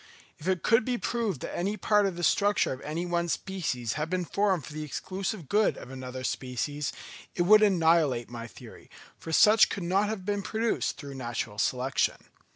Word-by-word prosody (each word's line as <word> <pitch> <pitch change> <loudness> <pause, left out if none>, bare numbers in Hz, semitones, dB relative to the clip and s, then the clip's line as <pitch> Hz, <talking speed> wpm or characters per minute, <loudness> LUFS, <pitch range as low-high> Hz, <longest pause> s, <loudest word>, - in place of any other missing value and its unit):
If 155 - -8
it 185 -3 0
could 225 +2 +4
be 245 +1 -1
proved 230 - -2
that - - -5
any 200 +4 -1
part 210 +1 +3
of 190 - -3
the 175 - -5
structure 205 -4 +2
of 130 - -9
any 160 +4 -3
one 170 -1 -1
species 155 - -2
had 155 +1 -3
been 180 0 -1
formed 195 -2 0
for - - -10
the 155 - -5
exclusive 185 - -4
good 210 +6 +2
of 125 - -10
another 130 -1 -7
species, 135 +3 -3 0.4
it 175 - +2
would 215 +4 +7
annihilate 165 - +3
my 115 0 -7
theory, 100 - -14 0.3
for 165 - -7
such 215 +7 +6
could 195 - -4
not 195 +4 +1
have 205 -4 -4
been 205 0 -1
produced 225 +3 -1
through 140 -2 -8
natural 120 -4 -4
selection. 125 +4 +1
175 Hz, 190 wpm, -28 LUFS, 135-205 Hz, 0.4 s, would